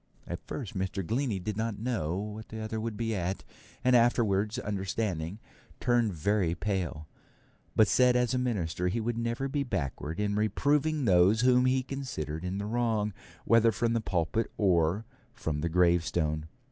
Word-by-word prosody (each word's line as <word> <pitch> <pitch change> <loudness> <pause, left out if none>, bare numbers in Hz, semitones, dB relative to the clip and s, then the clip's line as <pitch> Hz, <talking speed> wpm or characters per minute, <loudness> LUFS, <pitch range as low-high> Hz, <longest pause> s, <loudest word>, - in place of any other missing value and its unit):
At 85 0 -5
first 120 -9 -5
Mr. 95 0 -2
Glennie 120 +1 0
did 95 +3 -4
not 110 -1 -2
know 105 -8 -2
what 105 +2 -6
the 110 - -6
other 110 0 -3
would 110 -2 -4
be 115 0 -1
at, 95 -1 -2 0.4
and 125 0 +4
afterwards 110 -3 +3
understanding, 100 -5 -2 0.4
turned 120 -3 +2
very 90 0 +1
pale; 85 -4 -2 0.7
but 110 - +6
said 125 +2 +4
as 125 -1 +2
a 130 - +1
minister 90 -8 -1
he 110 +6 0
would 115 +1 -1
never 115 +3 -1
be 145 +1 -1
backward 80 - -3
in 105 -1 0
reproving 145 +8 +1
those 95 +3 +5
whom 125 0 +5
he 130 0 +2
considered 90 - -5
in 90 +2 -3
the 100 - -3
wrong, 110 -2 0 0.3
whether 115 0 +5
from 115 +2 0
the 115 - +1
pulpit 95 +3 -1
or 90 +1 +2 0.3
from 75 -2 -3
the 85 - 0
gravestone. 85 -3 +2
105 Hz, 165 wpm, -29 LUFS, 90-120 Hz, 0.7 s, but